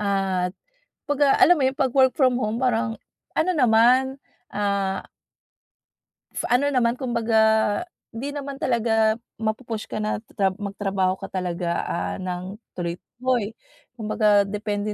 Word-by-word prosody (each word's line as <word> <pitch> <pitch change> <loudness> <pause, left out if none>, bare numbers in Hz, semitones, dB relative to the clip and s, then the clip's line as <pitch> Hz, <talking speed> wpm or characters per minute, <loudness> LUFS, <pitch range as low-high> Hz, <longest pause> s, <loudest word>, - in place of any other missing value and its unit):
at 195 -3 0 0.6
'pag 290 0 -1 0.2
alam 355 +1 +7
mo - - +2
yun - - -2
pag 265 -1 +2
work 260 -2 +5
from 260 -4 +4
home 215 -1 -1
parang 230 -2 +1 0.4
ano 360 - +2
naman, 255 +2 +4 0.3
ah 200 -2 0 1.3
Sa - - -3
ano 280 +4 +3
naman, 240 -4 +2
kumbaga, 220 -3 +2 0.3
hindi 255 +6 -4
naman 280 -1 -6
talaga 225 -2 +2 0.2
mapu-push 220 0 -3
ka - - -4
na 210 0 -2 0.2
tra 190 -2 +2
magtrabaho 195 -2 -1
ka 195 - -7
talaga, 175 -2 -2
ah, 170 - -2
ng 185 +2 -5 0.2
tuloy-tuloy. 220 +6 -2 0.4
Kumbaga, 210 -2 +3
depende 210 +1 -3
220 Hz, 130 wpm, -24 LUFS, 200-250 Hz, 1.3 s, alam